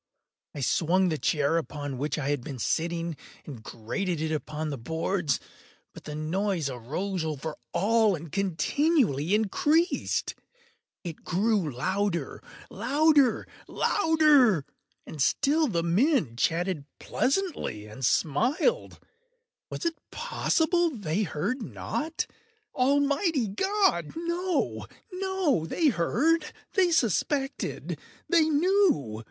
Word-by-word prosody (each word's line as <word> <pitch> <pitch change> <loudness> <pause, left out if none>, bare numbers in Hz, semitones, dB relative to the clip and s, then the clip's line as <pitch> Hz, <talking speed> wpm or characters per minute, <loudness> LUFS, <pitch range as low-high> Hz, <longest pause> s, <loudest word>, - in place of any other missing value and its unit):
I 145 - -5
swung 180 +7 +2
the 155 -3 -2
chair 150 +1 +1
upon 145 -5 -4
which 150 +3 -1
I 140 -2 -2
had 145 -4 -1
been 135 0 -6
sitting, 170 +5 -1 0.3
and 130 -7 -8
grated 150 - -3
it 155 0 -2
upon 155 0 -3
the 140 - -4
boards, 160 +2 -1 0.5
but - - -12
the 150 - -6
noise 165 0 -1
arose 160 - -3
over 155 0 -4 0.2
all 215 +2 +3
and 160 -1 -9
continually 195 - +1
increased. 295 - +1 0.7
It 170 -4 -7
grew 195 -3 +1
louder—louder—louder! 250 - +1 0.4
And 150 - -6
still 300 - +2
the 170 -8 -1
men 190 - +2
chatted 165 +3 0
pleasantly, 275 - -1
and 110 +5 -10
smiled. 245 - +1 0.7
Was - - -5
it 335 -1 0
possible 345 -7 +1
they 205 - -2
heard 200 - -2
not? 310 +7 -3 0.5
Almighty 280 - +2
God!—no, 345 - 0 0.3
no! 370 - 0
They 315 - +2
heard!—they 315 - +1
suspected!—they 295 - 0
knew! 310 - +2
195 Hz, 100 wpm, -27 LUFS, -, 0.7 s, all